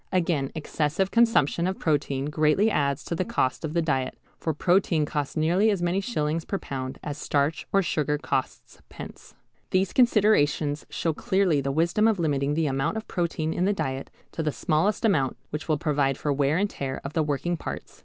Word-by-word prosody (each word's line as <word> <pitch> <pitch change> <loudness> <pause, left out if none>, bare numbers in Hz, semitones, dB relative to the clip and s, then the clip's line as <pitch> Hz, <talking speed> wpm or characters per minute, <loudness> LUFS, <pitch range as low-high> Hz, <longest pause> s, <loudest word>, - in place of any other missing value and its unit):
Again, 165 -7 0
excessive 160 +4 -1
consumption 225 -8 +3
of 190 - -2
protein 140 -3 0
greatly 155 +8 +2
adds 140 -3 0
to - - -3
the 170 - 0
cost 130 -6 -1
of 155 -1 -3
the 170 - +2
diet, 135 -5 -1 0.2
for 160 - -1
protein 170 0 +2
costs 145 +1 -3
nearly 175 +7 +3
as 195 -4 0
many 175 +3 +1
shillings 160 -8 -1
per 195 - -3
pound 130 -6 -5
as 150 0 -5
starch 145 +1 0
or 195 0 +3
sugar 150 -3 0
costs 130 -2 -4
pence. - - -11 0.3
These 185 0 +1
considerations 180 - +3
show 165 - -1
clearly 180 -3 +1
the 135 0 -1
wisdom 170 +9 +2
of 220 -2 +2
limiting 145 -3 0
the 160 0 +1
amount 135 +7 -1
of 220 - -6
protein 165 -2 -1
in 180 - 0
the 205 - +2
diet 135 -7 -3 0.2
to - - -4
the 155 -1 0
smallest 165 - 0
amount 140 - +2
which 150 +1 -5
will 155 -2 +2
provide 140 -3 0
for 145 - -1
wear 140 +2 +1
and 200 +2 +2
tear 135 -1 -4
of 140 - -6
the 160 - +1
working 150 +4 -1
parts. - - -7
155 Hz, 195 wpm, -26 LUFS, 145-185 Hz, 0.3 s, consumption